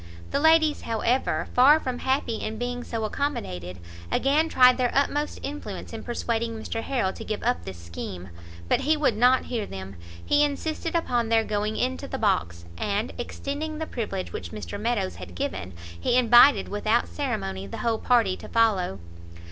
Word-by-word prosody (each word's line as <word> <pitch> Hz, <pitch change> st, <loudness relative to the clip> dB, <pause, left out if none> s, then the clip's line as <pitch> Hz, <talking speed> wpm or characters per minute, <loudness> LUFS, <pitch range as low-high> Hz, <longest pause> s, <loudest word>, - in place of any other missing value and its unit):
The 280 Hz, -, +1 dB
ladies, 320 Hz, 0 st, +4 dB
however, 230 Hz, +3 st, 0 dB
far 280 Hz, +5 st, +7 dB
from 255 Hz, -4 st, -4 dB
happy 260 Hz, -4 st, 0 dB
in 220 Hz, 0 st, -4 dB
being 245 Hz, +1 st, -3 dB
so 230 Hz, -2 st, -4 dB
accommodated, 95 Hz, -, -3 dB, 0.3 s
again 300 Hz, +4 st, +2 dB
tried 250 Hz, -3 st, +6 dB
their 250 Hz, -1 st, +2 dB
utmost 290 Hz, +2 st, +1 dB
influence 255 Hz, -9 st, -6 dB
in 225 Hz, -, -5 dB
persuading 230 Hz, -1 st, -2 dB
Mr 225 Hz, +1 st, -4 dB
Harrel 230 Hz, -7 st, -1 dB
to -, -, -8 dB
give 215 Hz, -, -4 dB
up 245 Hz, +1 st, 0 dB
this 95 Hz, -, -7 dB
scheme; 85 Hz, +2 st, -7 dB, 0.4 s
but -, -, +3 dB
he 310 Hz, +2 st, +2 dB
would 280 Hz, -7 st, +2 dB
not 250 Hz, +3 st, +4 dB
hear 230 Hz, -4 st, -3 dB
them, 95 Hz, -1 st, -8 dB, 0.3 s
he 295 Hz, 0 st, +4 dB
insisted 315 Hz, +3 st, -2 dB
upon 245 Hz, -8 st, 0 dB
their 225 Hz, -1 st, +4 dB
going 215 Hz, 0 st, -2 dB
into 260 Hz, +2 st, -1 dB
the 265 Hz, -, -4 dB
box, 85 Hz, -, 0 dB
and, 205 Hz, +3 st, -1 dB
extending 290 Hz, +5 st, -4 dB
the 320 Hz, -, -3 dB
privilege 205 Hz, -9 st, -4 dB
which -, -, -5 dB
Mr 210 Hz, -1 st, -6 dB
Meadows 220 Hz, -4 st, -1 dB
had 90 Hz, -1 st, -9 dB
given, 90 Hz, +1 st, -3 dB, 0.3 s
he 240 Hz, -, +2 dB
invited 240 Hz, -2 st, +6 dB
without 215 Hz, +3 st, +1 dB
ceremony 95 Hz, -, -3 dB
the -, -, -7 dB
whole 225 Hz, -1 st, +1 dB
party 230 Hz, -7 st, +3 dB
to -, -, -11 dB
follow. 205 Hz, -, +2 dB
235 Hz, 170 wpm, -26 LUFS, 205-270 Hz, 0.4 s, far